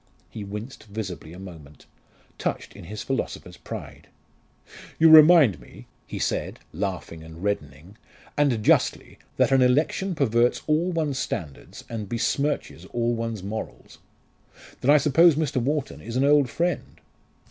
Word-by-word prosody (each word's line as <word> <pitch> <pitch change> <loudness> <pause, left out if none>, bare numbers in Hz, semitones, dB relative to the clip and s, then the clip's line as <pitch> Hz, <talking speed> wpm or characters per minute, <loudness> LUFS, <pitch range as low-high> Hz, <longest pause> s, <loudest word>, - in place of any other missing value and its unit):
He 105 - -7
winced 105 +6 -8
visibly 100 -6 -6
a 90 - -11
moment, 80 -6 -12 0.5
touched - - -3
in - - -11
his 105 +3 -7
philosopher's 135 - -4
pride. - - -9 0.9
"You 160 0 +6
remind 155 - +8
me," - - -15 0.2
he - - -6
said, - - -2 0.2
laughing 90 -3 -4
and 80 +2 -11
reddening 85 -1 -4 0.4
"and 135 -7 +1
justly - - +1 0.2
that - - +3
an 135 -1 +4
election 150 +9 +1
perverts 120 -4 +1
all 160 +4 +1
one's 155 -5 -1
standards 75 -10 -6
and 110 -4 -6
besmirches 130 - -2
all 120 +2 -1
one's 115 -4 -4
morals. 110 +3 -7 0.8
Then 130 - -1
I 150 - +8
suppose 155 +3 +5
Mr. 150 -3 -1
Wharton 145 +2 -2
is 115 +1 -7
an 130 - +2
old 145 -3 +4
friend?" 175 +6 -2
120 Hz, 140 wpm, -25 LUFS, 95-145 Hz, 0.9 s, remind